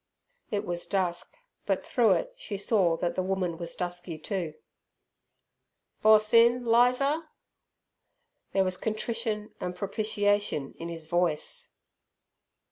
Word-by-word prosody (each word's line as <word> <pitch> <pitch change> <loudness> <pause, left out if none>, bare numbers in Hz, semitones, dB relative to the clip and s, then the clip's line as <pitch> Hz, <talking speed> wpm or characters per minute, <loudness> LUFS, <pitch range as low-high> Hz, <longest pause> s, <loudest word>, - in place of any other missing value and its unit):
It 205 -2 -2
was 175 0 -3
dusk, 180 -3 -1 0.3
but - - 0
through - - +4
it - - -2
she 225 - -5
saw 195 -5 +2
that 175 0 -1
the - - -1
woman 185 -3 -2
was 170 -1 -5
dusky 175 -2 -4
too. 170 -2 -4 1.5
"Boss 215 +1 +5
in, 235 +1 +5
Lizer?" 250 +7 +3 1.3
There 195 - +3
was 185 -1 -1
contrition 220 0 -2
and 180 0 -4
propitiation 205 -5 0
in 170 - -5
his 165 -2 -5
voice. 170 -2 0
195 Hz, 120 wpm, -28 LUFS, 175-220 Hz, 1.5 s, Boss